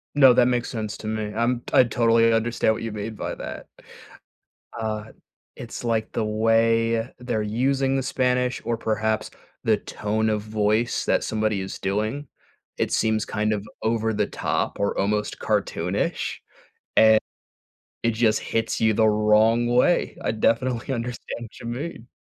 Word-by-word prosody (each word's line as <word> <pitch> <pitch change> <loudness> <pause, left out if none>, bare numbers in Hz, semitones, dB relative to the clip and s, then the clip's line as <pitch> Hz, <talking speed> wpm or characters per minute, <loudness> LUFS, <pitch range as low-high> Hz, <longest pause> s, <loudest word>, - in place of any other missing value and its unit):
No, 135 -3 +8
that 125 0 +5
makes 125 -1 0
sense 110 -3 -4
to 110 - -8
me. 110 -1 -3
I'm 120 +1 0
I 130 - +7
totally 115 0 +3
understand 115 -1 +1
what 110 - -6
you 115 -2 -4
mean 105 +1 -5
by - - -4
that. - - -7 1.1
Uh, 110 -1 -3 0.5
it's, 120 0 -8
like, 115 -2 -1
the 110 - -1
way 115 +2 +2
they're 120 -3 -2
using 135 +5 +1
the 135 - 0
Spanish 125 -1 0
or 115 0 -1
perhaps 110 -1 -1 0.3
the - - +4
tone 110 +1 -2
of 105 -1 -1
voice 110 +2 0
that - - +1
somebody 110 -2 0
is 95 - -6
doing. 110 +8 -2 0.5
It - - -1
seems 110 -1 +1
kind 110 +1 -1
of 105 0 -3 0.2
over 110 0 0
the 105 -1 +1
top - - -2
or 100 0 0
almost 105 +1 -1
cartoonish, - - -1 0.6
and 110 0 +7 0.8
it 115 - +3
just 110 -1 +2
hits 115 0 -2
you 110 -1 +3
the 110 +1 +3
wrong 110 +2 +3
way. 125 +9 +2
I - - +1
definitely 120 +4 0
understand 120 0 -5
what - - -16
you - - -10
mean. 120 0 -5
115 Hz, 155 wpm, -24 LUFS, 110-120 Hz, 1.1 s, No